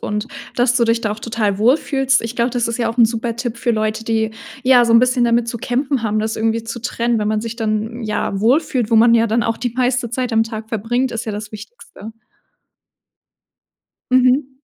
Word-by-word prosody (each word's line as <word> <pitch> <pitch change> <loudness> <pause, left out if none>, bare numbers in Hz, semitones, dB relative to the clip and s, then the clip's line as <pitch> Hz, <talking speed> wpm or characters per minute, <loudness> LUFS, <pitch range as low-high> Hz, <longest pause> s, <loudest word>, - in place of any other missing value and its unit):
und 210 +3 -3 0.3
dass 245 0 +2
du 240 - +3
dich 230 0 +1
da 215 - -2
auch 210 - -4
total 220 -3 -2
wohlfühlst. 270 +3 +2
Ich 230 +1 -6
glaube, 235 +1 +1
das 240 -1 -1
ist 230 - -3
ja 230 -2 0
auch 230 - -5
'n 240 - +6
super 230 +1 -2
Tipp 235 0 -4
für 240 0 0
Leute, 215 0 -2
die, 220 -1 0 0.3
ja, 250 -2 +5
so 230 - +1
'n 230 - +7
bisschen 250 -1 +2
damit 235 0 +1
zu 235 - -4
kämpfen 260 +2 -1
haben, 215 0 0
das 220 +1 -2
irgendwie 225 +1 0
zu 230 +1 -7
trennen, 235 0 -1
wenn 210 - -1
man 215 0 0
sich 230 +1 -6
dann, 225 +1 -3
ja, 210 -2 -2
wohlfühlt, 250 0 +1
wo - - +5
man 230 +1 +6
ja 230 0 +3
dann 230 +1 +1
auch 230 -1 -1
die 245 - -3
meiste 250 -1 0
Zeit 250 +1 -3
am 225 0 +3
Tag 220 -1 -7
verbringt, 240 +4 -1
ist 230 -1 -4
ja 220 - -4
das 210 0 -6
Wichtigste. 215 0 -11 2.0
Mhm. 255 +2 +3
230 Hz, 220 wpm, -18 LUFS, 220-245 Hz, 2.0 s, n